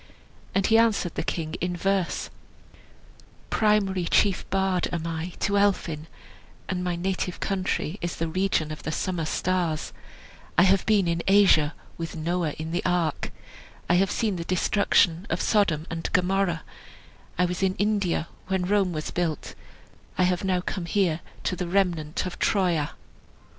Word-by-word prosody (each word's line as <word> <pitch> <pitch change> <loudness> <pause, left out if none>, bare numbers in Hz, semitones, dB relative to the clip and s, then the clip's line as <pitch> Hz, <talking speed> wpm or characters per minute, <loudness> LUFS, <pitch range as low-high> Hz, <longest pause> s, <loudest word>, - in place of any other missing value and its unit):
And 195 0 +3
he 225 0 +5
answered 215 -7 +2
the - - -2
king 160 -2 -3
in 180 0 -1
verse: 195 -1 0 1.2
"Primary 200 -4 +2
chief 195 +2 +2
bard 190 -2 +1
am 170 -2 -3
I 165 +1 -4
to 200 0 +2
Elphin, 165 -6 0 0.6
And 180 -1 -2
my 180 -1 -1
native 180 0 -2
country 190 -1 -2
is 175 -1 -2
the 165 - -2
region 170 -2 0
of 155 - -6
the 155 - -3
summer 170 0 -2
stars; 170 -1 -1 0.6
I 175 - +7
have 190 0 +3
been 205 -4 +4
in 170 0 0
Asia 190 -6 +5 0.2
with 165 0 -4
Noah 165 -1 -1
in 160 +1 -6
the 175 - -1
ark, 175 -4 0 0.6
I - - +3
have 190 +2 +3
seen 215 -5 0
the 170 - -3
destruction 180 0 +2
of - - -1
Sodom 180 -8 +2
and 165 0 -3
Gomorrah, 180 -2 +1 0.7
I 180 - +3
was 180 +1 -3
in 190 -1 +2
India 200 -5 0 0.2
when 190 -1 0
Rome 195 -2 +2
was 155 -1 -4
built, 165 -4 -2 0.6
I 185 - +3
have 180 0 +1
now 185 -2 +1
come 180 -1 -4
here 175 -4 +1 0.2
to - - 0
the 180 -1 -3
remnant 170 -5 0
of 180 - -6
Troia." 175 -7 +1
180 Hz, 160 wpm, -26 LUFS, 165-195 Hz, 1.2 s, I